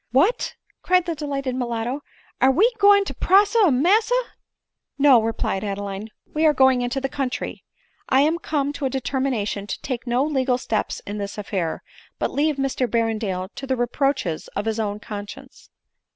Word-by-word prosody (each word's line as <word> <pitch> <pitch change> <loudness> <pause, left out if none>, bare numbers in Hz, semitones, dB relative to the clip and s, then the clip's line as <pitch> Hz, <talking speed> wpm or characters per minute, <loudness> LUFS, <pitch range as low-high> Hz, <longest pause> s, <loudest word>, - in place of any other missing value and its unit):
" - - -51
What 295 - +2
!" - - -38
cried 365 -1 +3
the 340 - -1
delighted 280 -4 -3
mulatto, 245 +2 -2 0.2
" - - -33
are 265 - +6
we 420 - +4
going 405 0 +6
to - - -5
prosecu 405 -1 +4
massa 420 - +3 0.3
?" - - -62
" - - -60
No," 275 -4 +6
replied 220 -3 -2
Adeline, 200 +1 -4
" - - -36
we 310 - 0
are 300 - +3
going 265 -1 +4
into 245 +2 -1
the 270 - -1
coun 270 -1 -2
try; - - -5 0.5
I 265 +1 +5
am 320 +4 +2
come 290 -3 -1
to 295 -2 -4
a - - +1
determination 255 -6 -2
to - - -4
take 255 -2 -4
no 245 +2 +2
legal 265 -4 +1
steps 225 -4 -2
in 205 +1 -5
this 200 +1 -5
affair, 190 -5 -3 0.3
but - - -1
leave 300 +1 +1
Mr 270 -2 -1
Berrendale 215 -5 -1
to 270 - -7
the 260 - +1
reproaches 245 - -1
of 200 - -2
his 225 0 -1
own 205 -1 -2
conscience." 205 -2 -9
260 Hz, 195 wpm, -23 LUFS, 220-290 Hz, 0.5 s, are